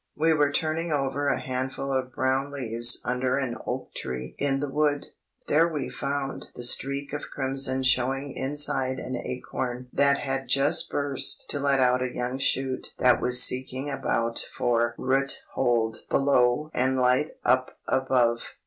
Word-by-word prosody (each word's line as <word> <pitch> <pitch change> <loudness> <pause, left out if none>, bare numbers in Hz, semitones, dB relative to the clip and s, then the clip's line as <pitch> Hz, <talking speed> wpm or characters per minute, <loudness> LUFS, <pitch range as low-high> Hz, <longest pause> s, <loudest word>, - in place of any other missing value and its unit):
We 160 +2 +3
were 145 -2 +2
turning 160 +3 -1
over 145 0 0
a - - +1
handful 130 +1 -3
of 130 -1 -1
brown 130 +2 0
leaves 120 -3 +2
under 125 +1 0
an 130 -4 -2
oak - - -4
tree 65 0 -5
in 135 -1 +1
the 145 - -2
wood; 145 0 0 0.4
there 160 +3 +4
we 155 -4 -3
found 140 -1 -3
the 120 - -6
streak 140 +3 0
of 145 - -5
crimson 135 -1 -1
showing 135 +2 +1
inside 130 -1 0
an 130 - -5
acorn 125 0 -4
that 140 0 +4
had 135 -1 -3
just 140 +1 +2
burst 140 -2 -1
to 145 - -2
let 140 -1 +2
out 125 0 +3
a 130 -1 -1
young 125 +2 -3
shoot 135 -1 -1
that 125 -1 +4
was 125 0 +5
seeking 130 +2 -1
about 115 -3 -1
for 120 -1 0
roothold 130 -4 0
below 135 +2 +2
and 130 +1 +1
light 125 +4 +2
up 130 +1 +2
above. 125 -3 +1
130 Hz, 155 wpm, -26 LUFS, 125-140 Hz, 0.4 s, was